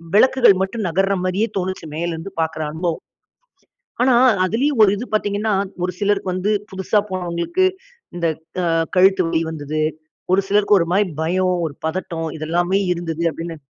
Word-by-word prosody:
விளக்குகள் 245 -1 +6
மட்டும் 210 +2 -2
நகர்ற 195 +4 +1
மாரியே 185 +5 0
தோணுச்சு, 185 -2 -3
மேலே 170 +2 -2
இருந்து 165 +4 -7
பார்க்கிற 160 -1 -2
அனுபவம். 165 +1 -2 1.0
ஆனா 260 0 +4 0.3
அதிலயும் 240 +6 +1
ஒரு 200 - +5
இது 240 - -5
பார்த்தீங்கன்னா, 210 +1 0 0.3
ஒரு 180 - -2
சிலருக்கு 200 -2 0
வந்து 185 +3 0 0.2
புதுசா 190 +2 +1
போனவங்களுக்கு 180 - -1 0.5
இந்த 170 -1 0 0.4
அ - - +1 0.3
கழுத்து 190 +1 +5
வலி 165 -1 0
வந்தது. 155 0 -3 0.5
ஒரு 195 - +4
சிலருக்கு 205 0 +4
ஒரு 170 - +1
மாதிரி 200 +1 +3
பயம், 185 +3 +1
ஒரு 145 - -8
பதட்டம் 165 -1 -3
இது 155 - -6
எல்லாமே 175 +3 +1 0.2
இருந்தது 170 -1 -4
அப்படின்னு. 165 +1 -6
185 Hz, 155 wpm, -20 LUFS, 170-205 Hz, 1.0 s, விளக்குகள்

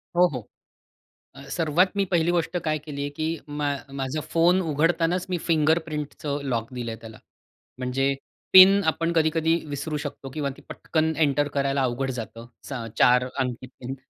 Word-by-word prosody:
हो, 180 +1 +6
हो. 125 -5 -6 0.9
अ, 135 - -11
सर्वात 170 +3 +2
मी 200 - +2
पहिली 170 -1 +2
गोष्ट 170 0 0
काय 155 -1 0
केली 145 -1 -8
आहे 145 - -3
की 155 +2 -3 0.2
मा 145 0 -2 0.3
माझा 135 +4 -2
फोन 175 +3 +4
उघडतानाच 165 +3 +1
मी 180 - 0
फिंगरप्रिंटचं 155 -2 0
लॉक 115 +1 -2
दिलं 120 -2 -4
आहे 110 - -9
त्याला. 110 -1 -11 0.6
म्हणजे 135 +2 0 0.4
पिन 195 +2 +9
आपण 165 +1 +1
कधी-कधी 160 +1 +2
विसरू 145 +2 -4
शकतो 145 -2 -6
किंवा 140 0 -2
ती - - -16
पटकन 160 0 -1
एंटर 145 -1 +2
करायला 140 -1 +1
अवघड 130 +2 -1
जातं. 115 -1 -6 0.2
असं 120 -4 -5
4 125 +1 +5
अंकी 125 -1 -2
पिन 130 +1 -8
150 Hz, 160 wpm, -25 LUFS, 130-165 Hz, 0.9 s, पिन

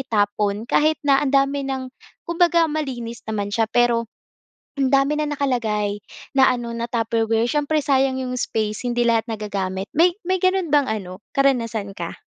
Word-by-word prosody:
itapon 205 -3 0
kahit 310 0 +3
na 275 -1 +4
ang 290 - 0
dami 275 +1 +3
ng 260 -1 -4 0.3
kumbaga 340 -1 +3
malinis 245 -7 -4
naman 205 -2 -2
siya, 225 +1 +2
pero 235 -1 +2 0.7
ang 270 -1 +2
dami 280 +2 +2
na 300 - 0
nakalagay 215 -7 -1 0.4
na 265 - +7
ano, 240 -1 -4
na 235 0 -3
Tupperware. 225 0 0
Siyempre 300 0 0
sayang 265 -2 +1
'yong 250 0 -3
space, 215 0 -2
hindi 240 0 0
lahat 230 -1 +2
nagagamit. 200 -4 -4
May 345 +2 +5
may 370 +2 0
gano'n 370 -3 +1
bang 290 -2 +4
ano, 195 -4 -4 0.2
karanasan 230 -7 +1
ka? - - -6
240 Hz, 160 wpm, -22 LUFS, 220-280 Hz, 0.7 s, na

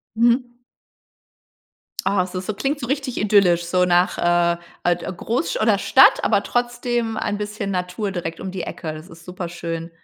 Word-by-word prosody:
Mhm. 240 +2 +2 1.5
Oh, 195 0 +2
es 185 0 -5
ist 185 +1 -4
so 215 - -2
klingt 275 +8 -2
so 245 - -4
richtig 270 -1 -2
idyllisch, 195 -5 +3
so 180 +1 +2
nach, 180 +1 +2
äh, 175 0 +2 0.3
ad 175 0 +1
Großsch 250 - -1
oder - - +3
Stadt, - - +5
aber - - +2
trotzdem 240 -2 -1
ein 205 -1 -2
bisschen 210 -1 -4
Natur 180 +2 -2
direkt 170 -3 -5
um 190 - -5
die 185 -1 -4
Ecke. 160 -1 -5
Das 155 +4 -10
ist 165 -1 -14
super 180 -1 -6
schön. 165 -1 -5
190 Hz, 175 wpm, -22 LUFS, 175-235 Hz, 1.5 s, Stadt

